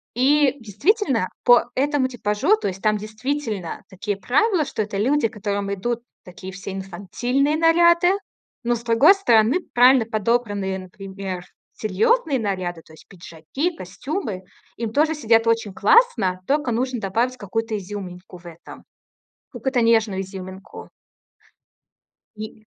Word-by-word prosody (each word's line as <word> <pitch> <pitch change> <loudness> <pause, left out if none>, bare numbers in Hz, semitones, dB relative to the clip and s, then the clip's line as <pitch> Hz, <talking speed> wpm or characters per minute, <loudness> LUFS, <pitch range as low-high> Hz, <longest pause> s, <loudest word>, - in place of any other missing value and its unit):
И 275 +2 +3
действительно, 240 - 0 0.2
по 245 -1 +6
этому 280 0 +1
типажу, 245 - +1
то - - -3
есть 195 0 -5
там 215 -1 +2
действительно 215 - -4
такие 200 +2 -4
правила, 310 - +1
что 220 - -3
это 205 -1 -4
люди, 255 +4 +2
которым 200 -2 -3
идут 235 +4 -3 0.2
такие 185 +1 -10
всё 195 +1 -7
инфантильные 240 +9 -1
наряды, 340 +2 +4 0.5
но, 240 +1 +1
с 235 - -8
другой 240 +10 +6
стороны, 245 - +3
правильно 250 0 +6
подобранные, 210 -3 -1
например, 190 -1 -7 0.3
серьёзные 265 - +1
наряды, 185 -5 -3
то 160 - -18
есть 160 - -17
пиджаки, 185 - -5
костюмы, 200 - -5 0.3
им 230 -2 -3
тоже 310 +6 +2
сидят 225 -6 +2
очень 230 -3 +1
классно. 225 - +3
Тока 285 -3 +1
нужно 250 +2 -1
добавить 230 +6 -1
какую-то 225 +1 -3
изюминку 185 -2 -8
в 175 - -22
этом, 170 0 -12 0.7
какую-то 265 -2 -1
нежную 220 -4 +2
изюминку. 190 0 -9 1.5
И 215 0 -9
225 Hz, 130 wpm, -22 LUFS, 195-265 Hz, 1.5 s, по